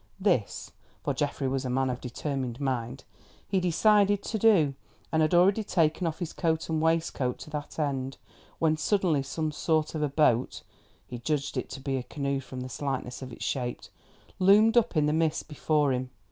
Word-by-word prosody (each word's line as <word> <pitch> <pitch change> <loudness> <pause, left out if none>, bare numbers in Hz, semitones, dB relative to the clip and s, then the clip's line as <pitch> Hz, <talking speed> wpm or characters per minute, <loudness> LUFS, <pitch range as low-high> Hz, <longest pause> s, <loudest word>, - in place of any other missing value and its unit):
This—for 145 - -2
Geoffrey 140 0 -1
was 130 0 -1
a 130 - -3
man 130 +1 +1
of 125 - -5
determined 130 -1 -4
mind—he 130 - -4
decided 205 +3 +3
to 220 - -3
do, 190 -10 +4 0.4
and 160 - +2
had 155 +2 +3
already 195 +5 +4
taken 165 -2 +1
off 160 - -3
his 175 -3 -5
coat 160 -2 -1
and 160 -1 0
waistcoat 160 -6 0
to 155 - -11
that 150 -1 -6
end, 135 -3 -2 0.4
when 155 -1 +2
suddenly 170 -3 +1
some 155 +3 -3
sort 155 0 0
of 155 - -3
a 150 - +1
boat—he 125 -3 -1
judged 145 +3 -2
it - - -3
to - - -7
be 135 0 -2
a - - -2
canoe 140 +1 -2
from 130 -1 -8
the 130 - -5
slightness 130 -1 -4
of 130 -1 -7
its - - -6
shape—loomed 195 - +1
up 230 -8 +3
in 150 - +4
the 150 - +1
mist 160 -1 0
before 150 -2 +1
him. 125 0 -3
150 Hz, 175 wpm, -28 LUFS, 130-165 Hz, 0.4 s, do